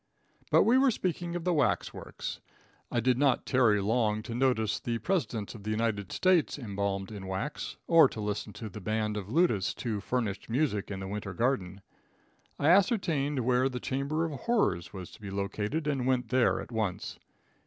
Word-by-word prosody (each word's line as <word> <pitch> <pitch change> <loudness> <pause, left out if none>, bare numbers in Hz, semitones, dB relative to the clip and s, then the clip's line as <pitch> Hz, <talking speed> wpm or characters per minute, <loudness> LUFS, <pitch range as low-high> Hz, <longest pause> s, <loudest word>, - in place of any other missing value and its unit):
But - - +6
we 245 +3 +5
were 270 0 +5
speaking 175 -5 -2
of 175 - -3
the 180 0 +1
wax 145 -5 +1
works. - - -6 0.5
I 120 - +1
did 125 +1 +2
not 140 -3 +2
tarry 120 -6 +4
long 110 +1 +1
to 115 - -6
notice 120 -4 +1
the 120 -1 -2
presidents 120 - -2
of 110 - -10
the 105 - -5
United 110 -3 -1
States 185 -6 +2
embalmed 100 -4 -3
in 100 -3 -7
wax, 95 +10 -4
or 165 -5 +6
to - - -8
listen 105 0 -3
to 110 - -7
the 105 +1 -9
band 110 +1 -1
of 100 -3 -4
lutists 120 - +1
who 110 -4 -2
furnished 110 -3 -2
music 120 -5 0
in 95 -2 -5
the 95 - -5
winter 100 -1 -5
garden. 100 -7 -1 0.8
I 145 - +2
ascertained 165 - +3
where 125 +1 +3
the 125 -1 -4
chamber 140 +6 -1
of 160 - -3
horrors 150 - +1
was 95 -4 -8
located, 105 +8 -3
and 135 -4 0
went 130 -1 +1
there 130 -1 +3
at - - -8
once. 110 -5 -3
115 Hz, 180 wpm, -30 LUFS, 105-145 Hz, 0.8 s, But